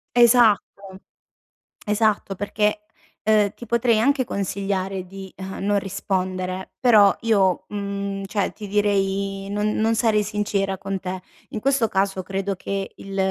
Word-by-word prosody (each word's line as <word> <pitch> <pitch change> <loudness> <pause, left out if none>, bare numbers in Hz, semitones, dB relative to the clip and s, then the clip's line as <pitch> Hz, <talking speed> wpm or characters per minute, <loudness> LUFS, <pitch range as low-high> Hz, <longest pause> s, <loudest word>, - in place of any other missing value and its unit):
Esatto, 220 -5 +3 0.9
esatto 210 -2 +1
perché, 210 +2 0 0.4
uhm, 210 -2 +4
ti 240 - -10
potrei 235 -1 +2
anche 265 +3 +2
consigliare 195 -2 -2
di, 190 0 -10
uhm, 190 +1 -6
non 205 0 +2
rispondere, 185 -1 -3
però 215 -5 +6
io, 195 -5 +2
mhmm, 200 -1 -4
cioè 200 +1 -1
ti 210 - -8
direi 195 -1 0
non 210 +1 0
non 225 +1 +2
sarei 220 -2 +2
sincera 200 -2 -1
con 195 0 -4
te. 185 0 -5 0.3
In 220 - -4
questo 270 -1 +2
caso 195 -1 0
credo 195 +1 -2
che 195 +1 -4
il 195 0 -8
200 Hz, 135 wpm, -23 LUFS, 195-215 Hz, 0.9 s, però